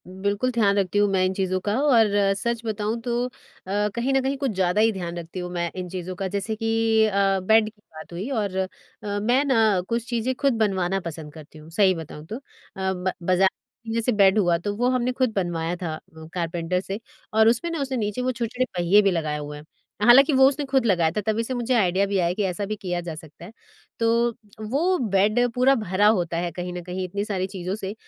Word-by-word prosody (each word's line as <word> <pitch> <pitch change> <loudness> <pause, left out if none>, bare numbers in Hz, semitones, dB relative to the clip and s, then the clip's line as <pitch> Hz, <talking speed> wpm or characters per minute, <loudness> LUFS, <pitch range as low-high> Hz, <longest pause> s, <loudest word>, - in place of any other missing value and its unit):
बिल्कुल 200 +6 -1
ध्यान 210 -4 +2
रखती 195 0 0
हूँ 205 - +4
मैं 190 -1 +2
इन 185 - 0
चीज़ों 185 -1 -1
का 205 - +1
और 245 -7 +5 0.3
सच 235 +2 -2
बताऊँ 215 +1 -2
तो 240 +1 -1
अ, - - -10 0.7
कहीं 245 +3 0
न 270 - +3
कहीं 270 +1 -1
कुछ 270 -3 -1
ज़्यादा 190 +1 +1
ही 225 +1 +4
ध्यान 175 -4 -5
रखती 170 +2 -7
हूँ 180 0 -5
मैं 170 -1 -1
इन 180 -1 -5
चीज़ों 185 0 -5
का। 195 +1 -3
जैसे 200 +3 -3
कि 225 0 +2
अ, 195 -1 +2
बेड 220 +4 +4
की 215 -1 -27
बात 155 +2 -10
हुई 190 +9 -4
और 210 -8 -2
अ, 190 0 0 0.5
मैं 245 +6 +2
ना 220 -8 +3
कुछ 235 0 -1
चीज़ें 240 +1 0
खुद 275 0 +1
बनवाना 195 -3 +1
पसँद 160 -4 -7
करती 155 0 -13
हूँ 155 +1 -13
सही 190 +1 +4
बताऊँ 155 -2 -8
तो। 215 - -6
अ, - - -10 0.5
ब 185 0 -2
बाज़ा 185 +2 +4 0.4
ये 225 +1 -1
सब 245 +2 +1
बेड 195 0 +5
हुआ 175 -4 +3
तो 205 +4 -3
वो 245 +4 +1
हमने 255 -1 +1
खुद 255 -2 0
बनवाया 175 -3 -1
था 175 -3 -4
अ, - - -10 0.3
कारपेंटर 170 0 -1
से 195 +2 -5 0.3
और 220 0 +5
उसमें 240 +9 +1
ना 330 - -3
उसने 265 -1 -2
नीचे 210 +1 -2
वो 255 +1 0
छोटे-छोटे 245 +1 -2
पहिये 180 +4 +5
भी 200 -1 +2
लगाए 155 -4 -1
हुए 150 0 -6
हैं। 150 - -12 0.4
हालाँकि 265 +7 +7
वो 265 0 +7
उसने 285 +1 -3
खुद 265 -2 +1
लगाया 175 -6 +3
था, 210 - 0
तभी 220 +2 0
से 255 - -4
मुझे 245 0 -1
आइडिया 195 -3 +2
भी 200 0 -1
आया 175 0 +1
कि 205 - -2
ऐसा 190 +1 -2
भी 215 +2 -3
किया 180 -4 -3
जा 170 -1 -6
सकता 160 +1 -12
है। 190 - -11 0.5
तो 235 +1 +2 0.4
वो 340 +9 +2 0.2
बेड 210 +4 +3 0.2
पूरा 260 +2 +4
भरा 205 -3 +1
होता 175 -6 +1
है 175 0 -2
कहीं 180 +2 -5
न 180 - -5
कहीं 180 +1 -4
इतनी 200 +3 -3
सारी 190 -3 -2
चीज़ों 185 -1 -4
से 195 -2 -5
200 Hz, 230 wpm, -24 LUFS, 180-230 Hz, 0.7 s, हालाँकि